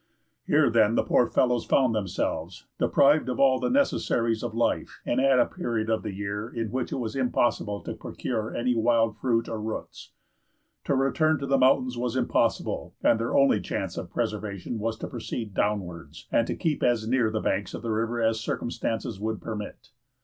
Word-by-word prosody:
Here, - - +4
then, 110 -1 +4
the - - +3
poor 120 - +3
fellows 125 -2 +2
found 130 -4 +3
themselves, 100 -5 -3
deprived 145 0 +4
of 125 - -3
all 130 -1 +4
the - - 0
necessaries 115 - +1
of 110 - -4
life, 120 - -1
and 125 - +1
at 135 -1 +4
a - - +5
period 115 -10 -2
of 110 - +1
the - - -4
year 100 +3 -4
in 115 -3 -4
which 130 0 -2
it - - -1
was 115 -2 -4
impossible 120 -5 0
to - - -5
procure 110 -3 -4
any 125 +1 0
wild 115 -1 +2
fruit 115 -3 +1
or 110 -1 -4
roots. 110 0 -6 0.7
To 140 - +1
return 155 +4 +2
to 140 - -4
the 135 0 +2
mountains 130 -1 +3
was 125 0 -2
impossible, 130 - 0
and 115 - +4
their 115 - 0
only 140 0 +4
chance - - -3
of - - -5
preservation 105 +1 -3
was 115 +1 -2
to - - -5
proceed 115 -2 -5
downwards, 95 -5 -3
and - - +2
to - - -2
keep 155 -3 -1
as 120 -3 +1
near 120 -2 +2
the 110 0 -2
banks 100 0 -1
of - - -8
the 115 - -2
river 115 +2 -1
as 110 0 +2
circumstances 110 -2 -3
would 110 0 -2
permit. 105 +2 -7
115 Hz, 190 wpm, -26 LUFS, 110-125 Hz, 0.7 s, a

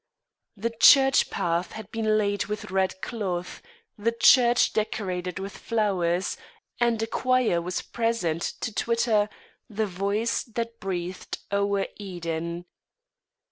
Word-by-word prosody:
The 230 +3 -2
church 270 -1 +7
path 170 +1 -1
had 220 -1 -9
been 220 -1 +1
laid 205 -1 0
with 210 -2 -5
red 190 0 0
cloth, 185 -7 -4 0.4
the 230 +3 +1
church 240 +1 +5
decorated 185 -5 -2
with 195 +1 -6
flowers, 190 -6 0 0.4
and 235 -2 +2
a - - +1
choir 250 -6 +1
was 180 +1 -3
present 225 -9 -1 0.2
to 225 - -3
twitter 225 -2 +1 0.4
"The 215 0 -1
voice 200 +4 -1
that 230 0 -5
breathed 180 -1 -4 0.2
o'er 200 0 +1
Eden." 170 -3 -4
205 Hz, 120 wpm, -26 LUFS, 180-230 Hz, 0.4 s, church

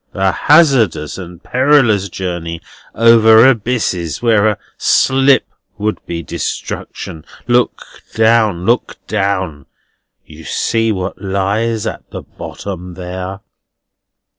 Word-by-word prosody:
A 95 -1 +2
hazardous 130 - +3
and 90 -2 -10
perilous 125 -7 +2
journey, 85 -2 -5 0.4
over 115 0 +6
abysses 110 - 0
where 110 -3 +3
a 105 - 0 0.2
slip 135 +1 +3 0.3
would 105 +1 -3
be 85 -1 -4
destruction. 80 0 -6 0.2
Look 120 0 +1 0.3
down, 110 -5 +2
look 120 +3 0
down! 95 -8 -2 0.6
You 80 +1 -13
see 115 +5 0
what 95 -2 -4
lies 105 +3 -1
at 110 - -6
the - - -8
bottom 90 -3 -8
there?" 95 +2 -6
105 Hz, 105 wpm, -15 LUFS, 90-115 Hz, 0.6 s, over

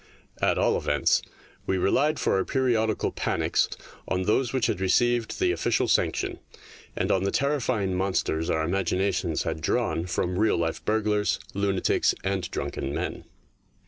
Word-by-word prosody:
At - - +2
all - - +2
events, 75 -1 +2 0.5
we 95 - +1
relied 145 +11 +2
for - - +1
our 95 - +1
periodical 115 -5 0
panics - - 0 0.4
on 95 0 0
those 115 +5 +1
which 130 -3 +1
had 95 - -1
received 120 +4 +1
the 365 -1 +3
official - - +1
sanction, - - 0 0.6
and - - 0
on 95 - +2
the 100 - +1
terrifying 125 -8 0
monsters 90 -4 0
our 80 -1 +1
imaginations 95 -1 0
had 80 -1 -3
drawn 80 +2 0
from 90 +1 -1
real 110 0 +3
life 80 -1 -2
burglars, 105 -1 +1 0.2
lunatics, 100 -1 +1
and 95 -2 -1
drunken 70 +2 -4
men. - - -4
95 Hz, 145 wpm, -26 LUFS, 90-110 Hz, 0.6 s, the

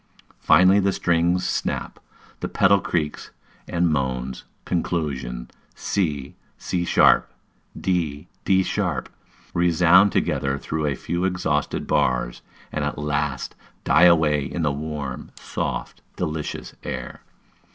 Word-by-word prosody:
Finally, 95 +4 +5
the 100 0 +2
strings 85 0 +1
snap, - - -3 0.4
the - - -3
pedal 100 0 +4
creaks 75 -5 -2 0.4
and 85 0 +1
moans; 65 -3 -2 0.2
conclusion, 70 -9 -2 0.3
c, 75 -9 -2 0.2
c 90 -1 -2
sharp, - - +4 0.5
d, 85 -4 -1 0.2
d 95 -1 +3
sharp 90 -10 -2 0.4
resound 90 +3 +5
together 70 0 0
through 75 +2 -2
a 70 - 0
few 85 +6 -3
exhausted 90 -6 -1
bars, - - 0 0.3
and - - -2
at - - -2
last 75 -2 -2 0.3
die 85 +3 +5
away 80 -4 +4
in 80 +5 -3
the 75 - +2
warm, 75 -2 -5
soft, - - -4
delicious 75 -1 -4
air. - - -6
80 Hz, 115 wpm, -23 LUFS, 70-90 Hz, 0.5 s, Finally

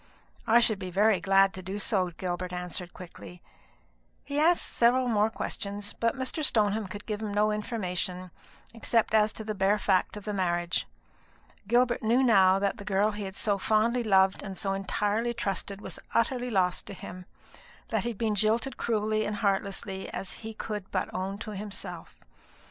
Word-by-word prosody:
"I 230 +2 +7
should 220 -4 +2
be 185 -2 -5
very 205 +2 +3
glad 195 0 +4
to 185 - -6
do 190 +3 -5
so," 195 -3 +1
Gilbert 175 +1 -4
answered 180 0 -4
quickly. 180 0 -11 0.8
He 285 +1 -2
asked 340 +3 +4
several 250 +2 +4
more 215 -2 +3
questions; 205 -2 -4
but 230 +2 0
Mr. 265 +4 -2
Stoneham 215 -5 +2
could 205 +2 -8
give 210 -1 -3
him 215 -2 -3
no 210 +1 +2
information, 185 -4 -3 0.4
except 230 -1 +1
as 215 0 +4
to 220 - -6
the 215 0 -3
bare 195 +1 +2
fact 195 0 +1
of 205 - -9
the 210 - -2
marriage. 175 -2 0 0.8
Gilbert 240 +2 +3
knew 235 +4 +3
now 195 -6 +6
that 200 +3 0
the 200 - -8
girl 205 +1 +2
he 205 -1 -5
had 190 0 -7
so 200 -1 0
fondly 225 +4 +2
loved 190 -3 +4
and 195 -2 -7
so 195 -1 -1
entirely 210 +4 -1
trusted 200 -2 -3
was - - -8 0.2
utterly 245 +2 +1
lost 185 -5 +1
to 200 - -7
him; 180 0 -9 0.6
that - - +1
he 240 - -1
had 230 - -6
been 220 -1 0
jilted 220 +5 +1
cruelly 215 -1 0
and 210 0 -2
heartlessly, 195 -1 -1
as 195 - -4
he 220 0 -7
could 210 -3 -5
but - - -2
own 190 +2 -3
to 215 +1 -7
himself. 195 -4 -7
205 Hz, 180 wpm, -28 LUFS, 190-220 Hz, 0.8 s, I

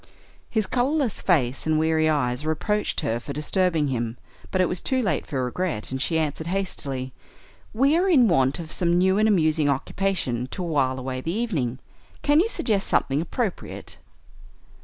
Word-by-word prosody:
His 220 -3 0
colorless 255 +3 0
face 135 -7 +1
and 155 0 +3
weary 160 0 +2
eyes 125 -3 0
reproached 210 +7 -1
her 115 +1 -1
for 140 +4 -7
disturbing 160 0 +1
him, 120 -2 -2 0.3
but 185 - -1
it 185 - +5
was 180 - -3
too 260 -1 0
late 215 -6 -1
for 130 -5 -1
regret, 140 - -3
and 130 0 -3
she 160 +3 +1
answered 160 0 -2
hastily, 140 -9 -3 0.6
"We 275 +7 +3
are 365 +3 +2
in 265 -9 +6
want 135 -7 +2
of 165 -2 -7
some 175 -1 +2
new 190 +2 +3
and 215 - +4
amusing 155 -7 +3
occupation 135 -4 -1
to 180 +7 -5
wile 140 -6 +1
away 130 0 -4
the 160 - -3
evening. 165 - -1 0.5
Can 290 +1 +4
you 405 +7 +2
suggest 210 - 0
something 140 +3 +1
appropriate?" 205 +3 -4
160 Hz, 170 wpm, -24 LUFS, 135-195 Hz, 0.6 s, in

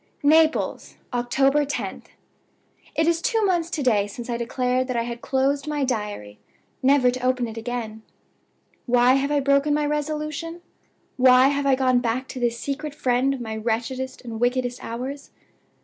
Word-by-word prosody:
"NAPLES, 315 +2 +2 0.2
October 270 +4 +2
10th. 285 0 -4 0.9
It 320 - +2
is 335 0 +2
two 445 +2 +1
months 345 -3 +1
to 310 -4 -2
day 210 -5 +2
since 240 +4 -7
I 235 - -1
declared 250 +2 -1
that 255 -2 -2
I 230 - +1
had 235 0 -6
closed 275 +2 0
my 295 -2 -1
Diary, 210 - -4 0.4
never 260 -1 +4
to 255 0 -6
open 255 -1 +1
it 225 - -8
again. 225 -1 -5 0.9
"Why 245 +1 +5
have 275 +1 +1
I 290 -1 +2
broken 280 +2 +2
my 300 0 0
resolution? 305 +3 -3 0.6
Why 255 +1 +6
have 285 0 -1
I 270 - +5
gone 255 -1 +2
back 245 +2 -2
to 260 - -6
this 235 -1 0
secret 290 +2 -4
friend 255 0 +1
of 270 -2 -4
my 220 -2 -5
wretchedest 235 +5 -3
and 230 -2 -6
wickedest 245 0 -1
hours? 260 +5 -6
255 Hz, 165 wpm, -23 LUFS, 240-285 Hz, 0.9 s, Why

